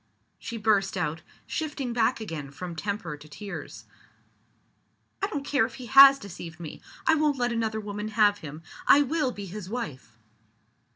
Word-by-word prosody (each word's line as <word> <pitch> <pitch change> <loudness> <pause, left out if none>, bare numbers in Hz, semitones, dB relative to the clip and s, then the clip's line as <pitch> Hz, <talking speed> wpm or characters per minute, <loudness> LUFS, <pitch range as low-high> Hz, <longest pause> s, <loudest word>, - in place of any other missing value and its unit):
she 235 - -6
burst 205 -3 +2
out, 160 -2 -2 0.2
shifting 290 -6 -3
back 240 +2 +2
again 160 -10 -6
from 170 +5 -7
temper 200 -2 -3
to 150 +1 -15
tears. 200 +6 -8 1.4
"I 395 - +1
don't 290 -8 -4
care 280 -4 +2
if 230 +1 -3
he 255 - -8
has 275 +3 +9
deceived 175 -7 -9
me. 160 -3 -8 0.2
I - - +5
won't 300 -2 +2
let 245 -1 0
another 220 -1 -1
woman 210 0 -5
have 210 -2 +3
him! 155 -1 -9 0.2
I 290 - +7
will 290 -1 0
be 205 -4 -7
his 190 0 -7
wife!" 150 - -6
215 Hz, 165 wpm, -27 LUFS, 175-255 Hz, 1.4 s, has